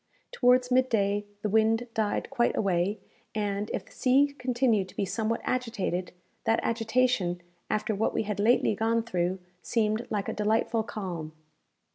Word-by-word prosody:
Towards 250 Hz, -, +3 dB
mid 255 Hz, +1 st, +4 dB
day, 205 Hz, -1 st, +1 dB, 0.2 s
the 210 Hz, -, 0 dB
wind 220 Hz, +3 st, +2 dB
died 215 Hz, +3 st, -1 dB
quite 240 Hz, -3 st, +1 dB
away, 190 Hz, +1 st, +1 dB, 0.4 s
and, 205 Hz, -1 st, -1 dB
if -, -, -3 dB
the -, -, -20 dB
sea 280 Hz, +2 st, +3 dB
continued 240 Hz, -6 st, +1 dB
to -, -, -15 dB
be 200 Hz, -, 0 dB
somewhat 225 Hz, +3 st, -1 dB
agitated, 220 Hz, -8 st, -2 dB, 0.3 s
that 225 Hz, -, +3 dB
agitation, 225 Hz, -5 st, +1 dB, 0.3 s
after 215 Hz, +1 st, 0 dB
what 210 Hz, +2 st, 0 dB
we -, -, -1 dB
had 210 Hz, -1 st, -4 dB
lately 220 Hz, +1 st, +3 dB
gone 225 Hz, +2 st, +1 dB
through, 185 Hz, -4 st, -1 dB, 0.2 s
seemed 220 Hz, 0 st, 0 dB
like 205 Hz, -2 st, -2 dB
a -, -, -2 dB
delightful 220 Hz, +2 st, +1 dB
calm. 180 Hz, -8 st, -5 dB
220 Hz, 155 wpm, -28 LUFS, 200-240 Hz, 0.4 s, mid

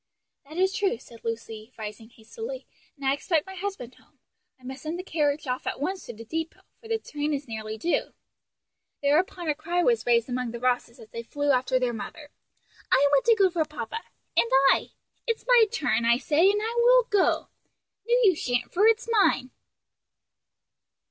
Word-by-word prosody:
"That 315 Hz, -, -9 dB
is 380 Hz, +1 st, +2 dB
true," 410 Hz, -, 0 dB
said 230 Hz, -1 st, -16 dB
Lucy, 225 Hz, 0 st, -6 dB
rising 220 Hz, 0 st, -8 dB
hastily, 450 Hz, -, -8 dB, 0.3 s
"and 280 Hz, -2 st, -9 dB
I 270 Hz, -, +3 dB
expect 305 Hz, +2 st, 0 dB
my 380 Hz, -, -9 dB
husband 380 Hz, -10 st, -5 dB
home. -, -, -26 dB, 0.4 s
I -, -, -25 dB
must 265 Hz, +2 st, -8 dB
send 320 Hz, +2 st, -4 dB
the 365 Hz, -, -5 dB
carriage 300 Hz, -4 st, 0 dB
off 255 Hz, -1 st, -3 dB
at -, -, -3 dB
once 370 Hz, +7 st, -3 dB
to 240 Hz, -, -6 dB
the 230 Hz, +2 st, -10 dB
depot; 320 Hz, +6 st, -4 dB, 0.2 s
for 450 Hz, -, -14 dB
the 450 Hz, 0 st, 0 dB
train 295 Hz, -7 st, -3 dB
is 280 Hz, 0 st, -6 dB
nearly 220 Hz, -1 st, -5 dB
due." 340 Hz, +11 st, -1 dB, 0.9 s
Thereupon 340 Hz, +4 st, +1 dB
a 305 Hz, -, +2 dB
cry 340 Hz, +4 st, -1 dB
was 470 Hz, -, +2 dB
raised 235 Hz, -1 st, +3 dB
among 250 Hz, -1 st, -2 dB
the 235 Hz, -, -5 dB
Rosses 245 Hz, -1 st, 0 dB
as 215 Hz, -, -14 dB
they 230 Hz, -, -5 dB
flew 290 Hz, +5 st, -1 dB
after 255 Hz, 0 st, +2 dB
their 250 Hz, -1 st, 0 dB
mother, 290 Hz, +6 st, -8 dB, 0.6 s
"I 285 Hz, +2 st, +5 dB
want 280 Hz, -2 st, +3 dB
to 460 Hz, -, +6 dB
go 390 Hz, -3 st, +3 dB
for 340 Hz, -2 st, +1 dB
papa!" 450 Hz, +8 st, -6 dB, 0.3 s
"and 230 Hz, 0 st, +3 dB, 0.2 s
I!" -, -, -4 dB, 0.3 s
"It's 460 Hz, -1 st, -2 dB
my -, -, +6 dB
turn, 245 Hz, -, 0 dB
I 235 Hz, +1 st, +4 dB
say, 310 Hz, +7 st, +3 dB
and 415 Hz, +1 st, +1 dB
I 450 Hz, +1 st, -2 dB
will -, -, +6 dB
go!" 410 Hz, -4 st, +1 dB, 0.6 s
"No, 475 Hz, -, +4 dB
you 380 Hz, -5 st, +5 dB
shan't, 245 Hz, -5 st, -2 dB
for 405 Hz, +5 st, +4 dB
it's 455 Hz, +2 st, +2 dB
mine." 395 Hz, -, +2 dB
295 Hz, 190 wpm, -26 LUFS, 245-385 Hz, 0.9 s, to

